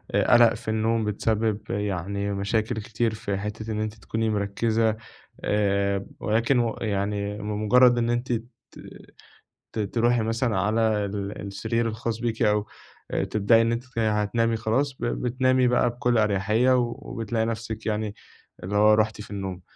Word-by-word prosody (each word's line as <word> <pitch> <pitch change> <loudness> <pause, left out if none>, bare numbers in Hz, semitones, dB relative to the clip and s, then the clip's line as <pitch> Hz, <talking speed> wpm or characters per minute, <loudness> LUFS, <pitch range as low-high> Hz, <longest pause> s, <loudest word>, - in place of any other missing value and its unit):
قلق 120 -1 +5
في 115 0 -10
النوم، 110 0 +1
بتسبب 110 0 0
يعني 100 0 -2
مشاكل 110 +4 -1
كتير 110 +1 -1
في 100 -2 -3
حتّة 105 +2 -5
إن 105 - -2
أنتِ 110 0 -2
تكوني 110 0 -2
مركزة 110 +2 0 0.5
آآ 100 -1 +1
ولكن 115 +4 +2
و 115 -2 0
يعني 100 -1 -2
بمجرّد 105 +4 +3
إن 120 0 +1
أنتِ 120 +1 -1
ت 115 +2 -4 1.2
ت - - -3
تروحي 115 +3 +1
مثلًا 115 -1 0
على 110 +3 +1 0.2
ال 100 0 -5
السرير 115 +4 -1
الخاص 115 0 -3
بيكِ 115 -1 -2
أو 105 -2 +2 0.6
تبدئي 110 +2 +4
إن 115 0 +1
أنتِ 115 +1 -2
تن 125 -2 -4
هتنامي 110 +1 +1
خلاص 125 +6 0
ب - - -2
بتنامي 130 +1 +1
بقى 125 0 +3
بكل 120 0 0
أريحية 110 +4 +3
وبتلاقي 120 -2 -2
نفسِك 115 -1 -4
يعني 105 -1 -2 0.5
اللي 95 +3 -3
هو 105 +1 +6
رُحتِ 110 -1 +1
في 100 - -11
النوم. 95 -2 -5
110 Hz, 150 wpm, -25 LUFS, 105-115 Hz, 1.2 s, هو